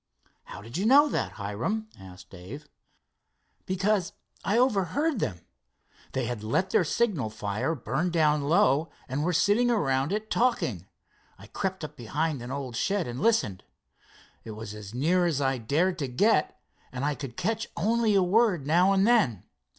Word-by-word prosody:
"How 100 - -10
did 115 +7 -7
you 200 +4 0
know 285 +4 +7
that, - - -2
Hiram?" 120 - -3
asked 95 0 -13
Dave. 110 +12 -10 1.0
"Because 190 0 0 0.3
I 210 - +1
overheard 255 - +1
them. 95 - -3 0.7
They - - -1
had 120 -4 -4
let 185 - 0
their - - +4
signal 175 - 0
fire 105 +8 -2
burn 135 +7 -2
down 155 -3 +2
low, 150 0 +3 0.2
and 135 +3 -2
were 175 - +1
sitting 205 +7 +3
around 140 - +1
it 215 +1 -3
talking. 125 - 0 0.5
I - - -13
crept 190 -2 -4
up 150 -1 -7
behind 145 +4 -2
an 120 - -7
old 135 -3 -5
shed 195 - 0
and 120 +3 -5
listened. 215 - +1 0.8
It 110 - -8
was 110 -1 -7
as 105 -2 -9
near 175 +7 +2
as 155 -5 0
I 135 -2 0
dared 170 +10 0
to 140 - -2
get, 150 - +1 0.3
and 130 +2 -3
I 150 - +1
could 135 -5 -8
catch 225 +4 -1
only 220 +3 +2
a 195 - +4
word 185 - +2
now 175 +6 +4
and 195 0 +3
then. 200 - +3
160 Hz, 165 wpm, -27 LUFS, 125-200 Hz, 1.0 s, know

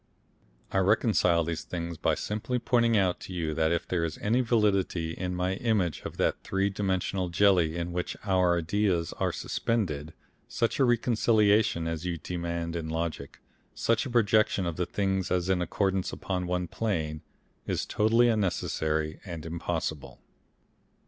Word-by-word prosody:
I 95 - +2
reconcile 90 -3 +3
these 80 -1 -3
things 85 -1 -5
by 80 - +1
simply 110 +4 -2
pointing 115 -1 +2
out 95 -3 +1
to 95 - -8
you 80 -3 -2
that 80 +1 +1
if 85 0 -1
there 90 -2 0
is 80 -1 -3
any 115 +5 +1
validity 100 -8 +1
in 90 +1 -3
my 90 +1 0
image 100 -9 0
of - - -6
that - - 0
three 95 +1 0
dimensional 95 -2 -1
jelly 85 -3 +3
in 85 0 -3
which 90 0 -3
our 90 -3 +3
ideas 85 0 0
are - - +1
suspended, 80 -9 -2 0.3
such 115 +3 -1
a 135 - +5
reconciliation 110 -6 +3
as 80 0 -3
you 90 -2 -2
demand 85 0 -4
in 80 -2 -3
logic, 80 -3 -4 0.3
such 115 +3 +1
a - - -6
projection 110 -4 +3
of 85 -2 -2
the 90 +1 -2
things 95 -2 -1
as 90 0 0
in 95 -2 +2
accordance 95 +1 0
upon 90 -2 -3
one 90 0 -1
plane, 80 -8 -2 0.5
is - - -1
totally 115 +3 +3
unnecessary 80 -7 0
and 85 -4 -7
impossible. 80 -3 -4
90 Hz, 155 wpm, -28 LUFS, 85-105 Hz, 0.5 s, a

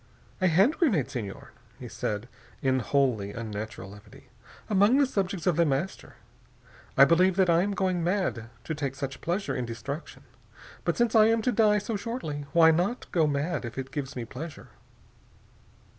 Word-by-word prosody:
"A 185 - +4
hand 195 - +3
grenade, 205 - +2
Senor," 105 -6 -6 0.3
he - - -8
said 105 +3 -4 0.4
in 130 -1 +2
wholly 120 -7 0
unnatural 105 -3 -6
levity. 100 0 -15 0.4
"Among 205 +5 +4
the 285 - +5
subjects 195 -7 -2
of 175 -4 +2
The 170 - +5
Master. 145 +7 -3 0.8
I 135 - +9
believe 180 +4 +4
that 185 -2 +3
I 170 +1 +4
am 200 +1 -1
going 185 -3 0
mad, 175 - -1
to 160 - -4
take 140 -3 -3
such 135 -1 -5
pleasure 180 +4 -2
in 125 - -2
destruction. 125 +7 -7 0.6
But - - 0
since 240 -1 +2
I 220 -1 +6
am 225 0 +2
to 250 - +2
die 215 -2 +4
so 210 +1 -2
shortly, 175 - -5
why 165 0 +6
not 180 +10 -1
go 160 -3 +3
mad, 145 +1 -1
if 120 0 -7
it 135 0 -5
gives 140 -1 -5
me 120 -2 -4
pleasure?" 150 +7 -9
160 Hz, 175 wpm, -27 LUFS, 130-195 Hz, 0.8 s, I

